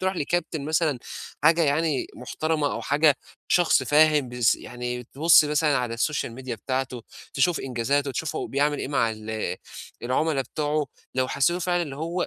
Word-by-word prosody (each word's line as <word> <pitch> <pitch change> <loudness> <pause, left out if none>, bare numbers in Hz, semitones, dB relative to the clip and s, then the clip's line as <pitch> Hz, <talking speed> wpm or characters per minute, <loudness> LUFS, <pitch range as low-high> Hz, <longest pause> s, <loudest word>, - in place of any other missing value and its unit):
تروح 190 0 -1
لكابتن 160 -1 -2
مثلًا 155 -3 +1 0.5
حاجة 165 +2 +5
يعني 150 -1 +1
محترمة 155 +3 -2
أو - - -4
حاجة 145 0 +3 0.4
شخص 175 -6 +4
فاهم 150 -1 +4
بيس 120 -2 +2
يعني 125 0 -6
تبُص 155 +4 +5
مثلًا 150 -1 +2
على 120 -2 -2
السوشيال 120 -1 -1
ميديا 130 -1 -6
بتاعته، 130 +1 -3 0.3
تشوف 165 +5 +2
إنجازاته، 135 +3 -1
تشوفه 150 +4 -3
هو - - -3
بيعمل 145 +2 0
إيه - - -4
مع 115 -5 +1
ال 110 0 -4 0.5
العملا 135 +4 0
بتوعه. 150 +1 -2 0.3
لو 130 0 +1
حسّيته 170 +6 +1
فعلًا 175 0 0
اللي 140 -4 -6
هو 170 +4 -2
145 Hz, 160 wpm, -25 LUFS, 125-160 Hz, 0.5 s, حاجة